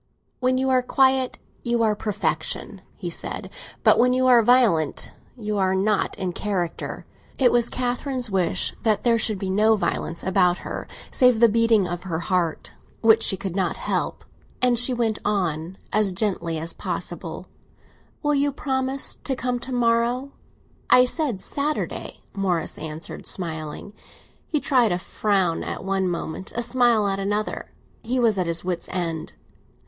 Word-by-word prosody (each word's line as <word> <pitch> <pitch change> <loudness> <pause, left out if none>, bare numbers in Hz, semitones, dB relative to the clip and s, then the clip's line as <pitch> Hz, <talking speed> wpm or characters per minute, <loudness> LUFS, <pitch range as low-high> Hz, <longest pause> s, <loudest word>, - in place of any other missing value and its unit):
"When 255 0 +2
you 265 0 +1
are 255 -1 +4
quiet, 260 0 +2 0.2
you 235 -1 +1
are 215 -1 +2
perfection," 210 0 -3
he - - -5
said; - - -4 0.3
"but - - +5
when 250 +1 +4
you 255 0 +2
are 245 -2 +7
violent, 220 - +3 0.3
you 210 -3 -2
are 190 0 +2
not 200 +2 0
in 185 -2 -3
character." 185 -4 -3 0.3
It 255 -3 +4
was 240 -1 +2
Catherine's 250 0 -1
wish 185 -3 0
that 215 -2 +1
there 235 -1 +3
should 215 -1 +1
be 190 0 -3
no 215 +3 +4
violence 170 -4 -2
about 180 -2 +3
her - - -5 0.2
save 250 -3 +4
the 235 - +7
beating 225 -3 +3
of 175 0 -4
her 175 -3 -3
heart, 175 -2 -1 0.3
which 225 0 +5
she 190 - +2
could 185 -1 -5
not 185 -4 0
help; - - -2 0.3
and 245 -2 +4
she 245 +2 +4
went 230 -3 0
on, 180 -3 -1 0.2
as 210 -2 +3
gently 180 -4 -1
as 165 +2 -3
possible, - - -4 0.8
"Will 295 0 +2
you 285 0 +2
promise 265 -1 -2
to 270 - -1
come 250 -1 -2
to 260 +2 -8
morrow?" 240 +2 +1 0.6
"I 250 - +7
said 250 - -1
Saturday!" 295 +2 -2
Morris 185 -5 -1
answered, 155 +1 -7
smiling. 160 +2 -4 0.5
He 305 - 0
tried 250 -7 +3
a 175 - +1
frown 190 -2 0
at - - -5
one 195 -1 0
moment, 170 +2 -4
a 240 - 0
smile 240 -3 +3
at 195 0 -1
another; 205 +2 -2 0.3
he 255 +3 -1
was 225 -5 +3
at 180 - 0
his 170 0 -1
wit's 180 -2 -3
end. 170 -3 -3
215 Hz, 160 wpm, -24 LUFS, 185-245 Hz, 0.8 s, are